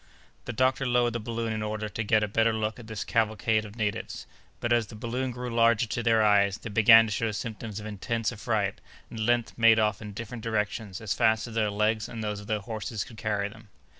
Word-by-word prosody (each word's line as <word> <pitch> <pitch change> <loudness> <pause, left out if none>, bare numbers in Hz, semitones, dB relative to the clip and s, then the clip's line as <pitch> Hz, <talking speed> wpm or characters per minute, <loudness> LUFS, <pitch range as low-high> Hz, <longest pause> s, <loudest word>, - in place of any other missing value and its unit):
The - - -3
doctor 130 +3 +1
lowered 120 -1 +2
the 120 - -2
balloon 115 0 -3
in 110 - -3
order 110 0 -3
to 115 +2 -4
get 110 0 +3
a - - 0
better 115 +2 +2
look 110 +1 -2
at 115 - -11
this 110 -3 -4
cavalcade 110 -1 +1
of 105 0 -11
natives; 105 -3 -3 0.3
but, 120 0 +1
as 120 -3 +2
the 110 - -11
balloon 120 +4 -3
grew 125 0 -5
larger 115 0 +4
to 115 +2 -3
their 115 -1 +3
eyes, 100 -2 +4
they 110 - -8
began 115 +2 +7
to 110 - -5
show 110 +2 0
symptoms 110 -1 -5
of 105 - -9
intense 110 +2 -2
affright, 105 -1 -2 0.3
and 115 - -7
at 110 - 0
length 120 -1 +1
made 115 -1 +6
off 105 -1 +1
in 105 -1 -7
different 115 +2 -7
directions 105 -3 -2
as 110 -3 -1
fast 110 -1 +2
as 115 - -9
their 110 -2 +1
legs 105 +1 0
and 110 -1 -6
those 105 -1 -3
of 105 - -11
their 105 -1 -1
horses 110 0 -4
could 120 -4 -13
carry 105 -2 -1
them. 110 +1 -14
110 Hz, 235 wpm, -27 LUFS, 105-115 Hz, 0.3 s, began